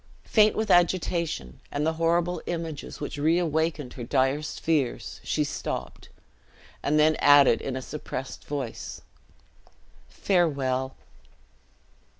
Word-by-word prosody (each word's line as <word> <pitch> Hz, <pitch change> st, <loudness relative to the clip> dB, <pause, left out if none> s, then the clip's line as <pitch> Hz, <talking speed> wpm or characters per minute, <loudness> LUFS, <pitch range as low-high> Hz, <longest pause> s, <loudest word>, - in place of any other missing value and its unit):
Faint 215 Hz, -1 st, +4 dB
with 220 Hz, -2 st, 0 dB
agitation, 170 Hz, -, +1 dB
and 145 Hz, +1 st, -1 dB
the 160 Hz, -, +1 dB
horrible 170 Hz, +1 st, +1 dB
images 165 Hz, -4 st, -5 dB
which 145 Hz, 0 st, -5 dB
reawakened 160 Hz, -3 st, +1 dB
her 125 Hz, -, -7 dB
direst 135 Hz, +4 st, 0 dB
fears, 150 Hz, -7 st, -1 dB
she -, -, 0 dB
stopped; -, -, -5 dB, 0.7 s
and 150 Hz, +2 st, +1 dB
then 155 Hz, +1 st, +5 dB
added 145 Hz, -4 st, +6 dB
in 135 Hz, -, -4 dB
a 130 Hz, -, -4 dB
suppressed 135 Hz, -2 st, -6 dB
voice, 140 Hz, -5 st, -5 dB, 1.1 s
"Farewell!" 135 Hz, -8 st, 0 dB
150 Hz, 110 wpm, -26 LUFS, 135-170 Hz, 1.1 s, added